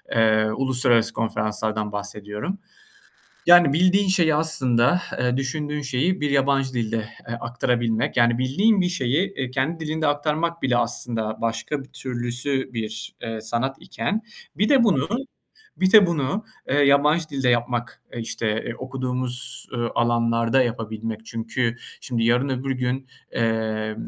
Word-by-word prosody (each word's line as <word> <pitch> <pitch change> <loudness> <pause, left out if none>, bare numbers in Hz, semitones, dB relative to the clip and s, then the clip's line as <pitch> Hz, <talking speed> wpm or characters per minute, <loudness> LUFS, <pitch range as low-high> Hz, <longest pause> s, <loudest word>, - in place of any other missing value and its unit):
ııı, 110 -1 +3
uluslararası 125 -3 +2
konferanslardan 110 -1 -1
bahsediyorum. 105 - -4 0.9
Yani, 175 -5 +7
bildiğin 185 +4 +3
şeyi 170 -5 +3
aslında 135 -1 +3 0.2
ı 125 0 +1
düşündüğün 150 +2 -2
şeyi 145 +8 0
bir 145 -1 0
yabancı 135 -1 +2
dilde 115 -1 -1 0.3
ı - - -4
aktarabilmek. 120 -1 -1
Yani, 120 0 +4
bildiğin 195 - +3
bir 180 - +2
şeyi 145 -1 -1
kendi 140 +6 -1
dilinde 155 0 -1
aktarmak 155 +3 0
bile 130 -2 +2
aslında 115 -2 -1
başka 115 +6 -2
bir - - -19
türlüsü 125 +2 -3
bir, 110 -1 -5
ııı, 110 -1 -5
sanat 120 +4 -2
iken 195 - -3 0.3
bir 210 - +2
de 265 -4 +5
bunu 155 - +2 0.7
bir 190 0 +2
de 210 -4 +9
bunu, 170 +6 -1 0.3
ııı, 145 +1 +3
yabancı 150 +4 +3
dilde 135 -2 -1
yapmak, 120 0 -1
işte 115 0 -2
okuduğumuz, 125 -1 -4
ııı, 120 -1 -2
alanlarda 115 +1 +2
yapabilmek. 110 -2 -4
Çünkü 115 +1 -2 0.2
şimdi 115 -3 -2
yarın, 125 +4 +2
öbür 135 +1 -2
gün, 130 +1 -2 0.2
eee, 110 -2 -1
125 Hz, 130 wpm, -23 LUFS, 115-145 Hz, 0.9 s, de